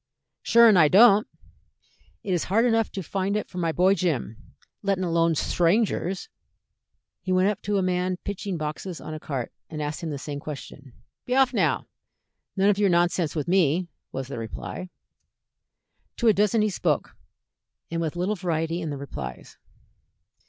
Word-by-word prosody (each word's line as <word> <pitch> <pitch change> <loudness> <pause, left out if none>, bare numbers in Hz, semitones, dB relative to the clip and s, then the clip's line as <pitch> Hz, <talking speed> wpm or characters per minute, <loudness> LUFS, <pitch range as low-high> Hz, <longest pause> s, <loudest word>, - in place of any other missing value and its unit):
"Shure 235 0 +6
an' 215 -4 +6
I 155 -3 +7
don't. 210 +4 +6 1.0
It 190 - -1
is 175 - 0
hard 225 +6 +2
enough 225 -2 +2
to 190 - -4
find 195 +4 -1
it 210 - -3
for 180 - -7
my 165 -2 +1
boy 185 +4 +4
Jim, 155 - -1 0.5
lettin' 195 -2 0
alone 165 -1 +2
sthrangers." 185 - +1 0.9
He 185 - -4
went 185 +2 +3
up 210 - -3
to 205 0 -1
a 190 - +1
man 180 0 0
pitching 200 -2 -4
boxes 155 +3 -5
on - - -7
a 155 - -5
cart, 135 -6 -4 0.2
and 155 - -6
asked 150 +2 -3
him 165 - -4
the 145 - -4
same 145 +1 -6
question. 140 -3 -9 0.3
"Be 250 - 0
off, 265 -1 +4
now! - - +1 0.7
none 195 +1 +4
of 200 - -2
your 205 -2 +3
nonsense 175 -2 +1
with 150 0 -2
me," 175 -1 +2 0.2
was 135 -1 -5
the 140 - -6
reply. 115 +10 -6 1.3
To 235 - +1
a 220 - +7
dozen 210 +2 +2
he 215 - +1
spoke, - - -1 0.8
and 165 0 -1
with 160 -1 -2
little 180 +4 0
variety 165 -2 -2
in 160 - -3
the 145 - -4
replies. 65 - -8
180 Hz, 175 wpm, -25 LUFS, 155-200 Hz, 1.3 s, I